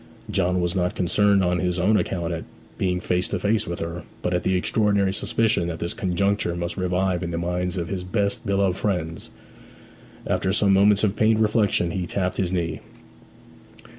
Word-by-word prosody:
John 90 -1 +1
was 90 0 -1
not 90 -1 0
concerned 100 +2 +3
on 90 0 +1
his 90 0 -1
own 95 +5 +3
account 85 -4 -1
at 80 - -4 0.4
being 90 -1 0
face 90 +1 0
to - - -2
face 105 +1 0
with 85 0 -3
her, 85 +1 -4 0.2
but 90 - 0
at 90 - +1
the 95 - +1
extraordinary 100 0 +2
suspicion 110 -4 +1
that 85 -1 -4
this 85 +1 -3
conjuncture 100 -2 0
must 85 0 -3
revive 90 0 0
in 85 - -3
the 85 - -3
minds 90 +2 -2
of 85 -1 -2
his 95 0 -4
best 100 +2 -1
beloved 100 -2 +1
friends. 90 -5 -2 1.0
After 95 - 0
some 100 -1 +3
moments 100 +1 +4
of 105 -1 +2
pained 110 0 +3
reflection 105 -5 +2
he 90 -1 -3
tapped 90 +1 -2
his 90 -2 0
knee. 85 -4 -2
90 Hz, 185 wpm, -24 LUFS, 90-100 Hz, 1.0 s, moments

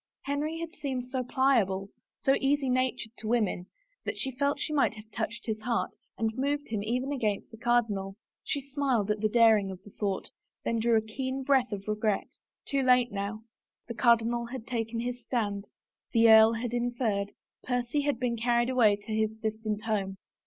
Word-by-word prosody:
Henry 295 +3 -2
had 335 0 -5
seemed 260 -6 -3
so 260 -1 -1
pliable, 225 -7 +2 0.3
so 270 - +5
easy 275 -1 +2
natured 255 -3 0
to 220 - -5
women, 215 -6 0 0.4
that - - -3
she 265 - -1
felt 280 +2 +1
she 305 - -2
might 275 -6 +2
have 215 +1 -13
touched 220 +1 -4
his 215 -1 -3
heart 235 +1 0 0.3
and 220 0 0
moved 285 +3 -1
him 215 -2 -1
even 250 +6 -1
against 215 -8 -1
the 225 - -11
cardinal. 215 -5 +1 0.3
She 285 - -1
smiled 265 -7 +1
at 210 - -1
the 215 +1 +1
daring 220 -3 +5
of 185 -1 -8
the 205 - -14
thought, 200 -2 -3 0.3
then 230 - +1
drew 230 0 +3
a - - +3
keen 260 +4 -4
breath 260 -3 +3
of 200 -1 -4
r^^et. 215 -1 -1 0.3
Too 275 -1 0
late, 250 -2 +4
now. 205 +2 -4 0.4
The 235 - -4
cardinal 235 +1 +3
had 245 -2 -7
taken 230 -1 -2
his 245 +1 -4
stand, 210 -4 -2 0.5
the 230 -1 +6
earl 220 +1 +8
had 235 +1 -3
interfered, 235 -4 -1 0.3
Percy 245 +3 0
had 285 -4 0
been 245 -2 0
carried 240 +1 +2
away 225 -5 +5
to 205 +2 -7
his 220 0 0
distant 220 -1 -3
home. 195 -3 -1
235 Hz, 185 wpm, -29 LUFS, 215-255 Hz, 0.5 s, earl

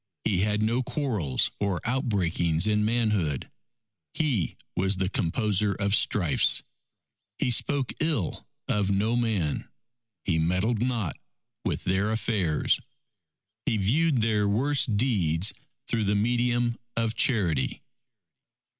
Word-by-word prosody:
He 95 -4 +1
had 105 +2 +1
no 115 +4 +1
quarrels 120 - 0
or 100 -4 0
outbreakings 95 - 0
in 105 -1 +2
manhood. 105 - 0 0.6
He 130 - 0 0.2
was 95 +1 +1
the 95 -1 0
composer 100 +2 0
of 100 +1 -1
strifes. 90 -7 +4 0.7
He 125 - 0
spoke 135 +2 0
ill 150 - -1 0.2
of 100 -2 0
no 105 +4 +1
man. 110 -11 -1 0.6
He 80 -3 +1
meddled 95 +8 +1
not 115 - -1 0.5
with - - -2
their 95 +3 +1
affairs. 105 -8 0 0.9
He 110 - +2
viewed 130 +7 +2
their 105 -2 +1
worst 130 0 +1
deeds 95 -7 +1 0.3
through 110 -2 0
the 100 +1 +1
medium 120 +2 +1 0.2
of 115 -1 0
charity." 90 - +1
105 Hz, 115 wpm, -27 LUFS, 95-120 Hz, 0.9 s, strifes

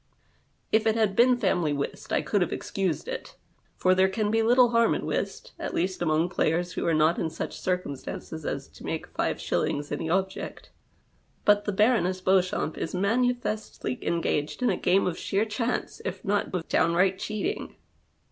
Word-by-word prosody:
If 220 0 +3
it 220 - +3
had 215 -4 +1
been 245 +2 +5
family 175 -10 +1
whist, 140 -1 -4
I - - +1
could 205 - +1
have 175 - +1
excused 190 - -2
it, - - -6 0.4
for 185 - +3
there 190 +1 +4
can 210 +2 -1
be 225 0 +3
little 245 +2 +5
harm 230 -1 +3
in - - -3
whist, - - -3
at - - -4
least 185 +1 -1
among 160 0 +2
players 175 0 0
who - - -2
are 165 - +3
not 155 +2 +3
in 160 - -1
such - - -5
circumstances 160 -2 -4
as - - -3
to - - -15
make - - -3
five - - -2
shillings 145 0 -1
any 160 +2 -2
object. 190 +2 -2 0.7
But 205 0 +4
the 205 - 0
Baroness 200 -3 +2
Beauxchamps 185 -4 +1
is 165 - -3
manifestly 215 - -1
engaged 165 - -1
in 250 - +3
a - - +1
game 195 +2 +2
of 175 -2 -2
sheer 200 +3 0
chance, 230 +3 -2
if 190 0 -5
not 205 +1 0
of 180 -3 -3
downright 185 +3 +2
cheating. 275 - -3
190 Hz, 175 wpm, -27 LUFS, 170-220 Hz, 0.7 s, been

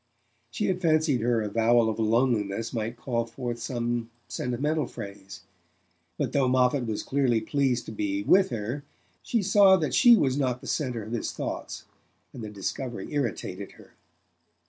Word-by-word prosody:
She 120 - -2
had 185 -1 -1
fancied 155 -6 +2
her 115 -1 +1
avowal 115 +2 +3
of 110 0 -2
loneliness 115 -2 +1
might 115 +1 -3
call 115 -2 -2
forth 120 0 -5
some 120 -1 -2 0.2
sentimental 140 +4 -1
phrase; 100 -2 -9 0.8
but - - -1
though 135 -2 +3
Moffatt 125 0 +2
was 110 -2 -3
clearly 130 -4 +1
pleased 130 +1 0
to - - -7
be 300 -1 -2
with 195 -7 +4
her 120 +4 -4 0.4
she 230 -4 0
saw 195 -1 +6
that 155 -4 -2
she 240 -2 +7
was 140 - +1
not 125 -3 0
the - - -13
centre 125 -7 -2
of 110 - -9
his 120 - -2
thoughts, - - -5 0.5
and 120 - -8
the 105 - -5
discovery 105 +4 -5
irritated 105 -8 -3
her. - - -18
120 Hz, 160 wpm, -27 LUFS, 115-145 Hz, 0.8 s, she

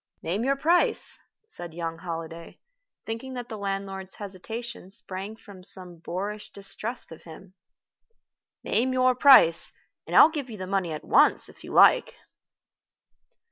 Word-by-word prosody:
"Name 190 +7 -2
your 275 +2 +2
price," 335 +5 +2 0.3
said 175 - -8
young 165 -1 -4
Holliday, 165 -1 -7 0.5
thinking 230 +4 -6
that 245 -1 -6
the 220 - -6
landlord's 195 -1 -5
hesitation 215 +2 -8
sprang 195 0 -8
from 200 -4 -14
some 180 -2 -3
boorish 200 +5 -5
distrust 215 +4 -7
of 165 - -11
him. 180 +3 -13 1.1
"Name 255 +3 0
your 255 0 +3
price, 245 - +6 0.4
and - - -4
I'll - - +9
give 290 -5 -5
you 220 - -8
the 185 - -5
money 190 -3 -1
at 155 - -6
once, - - +4
if - - -16
you - - -9
like." - - +5
195 Hz, 140 wpm, -26 LUFS, 175-235 Hz, 1.1 s, I'll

